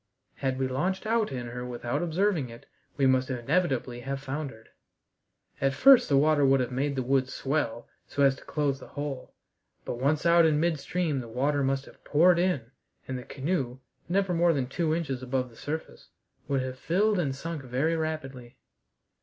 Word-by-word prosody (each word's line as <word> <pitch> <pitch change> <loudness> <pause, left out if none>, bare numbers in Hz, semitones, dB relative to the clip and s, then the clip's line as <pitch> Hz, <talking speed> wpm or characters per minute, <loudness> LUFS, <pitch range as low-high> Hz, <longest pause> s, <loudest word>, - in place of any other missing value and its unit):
Had 130 -1 -1
we 130 0 0
launched 180 +11 -1
out 220 -3 +1
in 125 -2 -4
her 120 +1 -6
without 125 +2 -3
observing 175 -4 0
it 115 0 -12 0.3
we 140 - +3
must 130 +1 +3
inevitably 130 -1 0
have 135 +2 -4
foundered. 135 -4 -6 0.9
At 135 0 +2
first 265 -2 +7
the 140 - +4
water 150 0 +4
would 135 0 +5
have 125 0 -1
made 140 +3 -1
the 130 - -1
wood 130 0 +1
swell 130 -3 -2 0.2
so 140 - 0
as 135 -1 +5
to - - -14
close 145 -3 -1
the - - -11
hole, 145 -3 -6 0.5
but 120 - -4
once 145 +4 +1
out 170 0 +6
in 155 -2 +3
midstream 165 -1 0
the 120 - -6
water 140 +5 0
must 135 0 0
have - - -17
poured 170 +3 +4
in, 145 -10 0 0.4
and 130 - -3
the 125 - -5
canoe, 135 -3 -2 0.3
never 190 0 +1
more 170 0 +4
than 135 -4 0
two 155 +5 -1
inches 135 -7 -3
above 130 -1 -2
the - - -17
surface, 160 +5 -6 0.4
would 135 -3 0
have 130 0 -6
filled 200 +6 +2
and 140 -6 -1
sunk 165 +2 -5
very 135 +6 0
rapidly. 135 -6 -5
140 Hz, 185 wpm, -28 LUFS, 130-160 Hz, 0.9 s, first